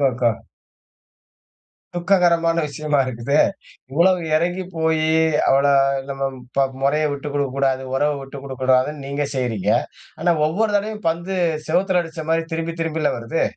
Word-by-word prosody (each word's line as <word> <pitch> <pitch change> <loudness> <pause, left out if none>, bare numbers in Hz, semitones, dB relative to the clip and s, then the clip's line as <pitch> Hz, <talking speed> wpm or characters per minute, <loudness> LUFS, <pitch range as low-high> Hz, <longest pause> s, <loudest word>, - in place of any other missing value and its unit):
இருக்கா? 125 -1 +1 1.6
துக்ககரமான 175 -2 +2
விஷயமா 145 0 -1
இருக்குதே. 130 +4 +1 0.5
இவ்ளோ 170 +5 +4 0.2
இறங்கி 175 +3 0
போயி 160 -1 +1 0.4
அவள 135 +1 +4 0.5
நம்ம 135 0 -5 0.3
ப 135 0 +4 0.2
முறைய 150 +3 +2
விட்டு 140 +1 -5
குடுக்கக்கூடாது, 135 -2 0
உறவ 145 +2 +2
விட்டு 135 +1 -9
குடுக்கக்கூடாதுன்னு 130 +2 0
நீங்க 140 +1 -2
செய்யறீங்க. 120 -7 -1 0.5
ஆனா 175 - +3
ஒவ்வொரு 210 +8 0
தடவையும் 210 -1 -3
பந்து 170 +4 -2 0.3
செவுத்துல 180 +2 +2
அடிச்ச 165 -1 -7
மாரி 165 0 +2
திரும்பி 165 0 -2
திரும்பில 160 -2 0
வருது. 115 +8 -2
155 Hz, 125 wpm, -21 LUFS, 135-170 Hz, 1.6 s, இவ்ளோ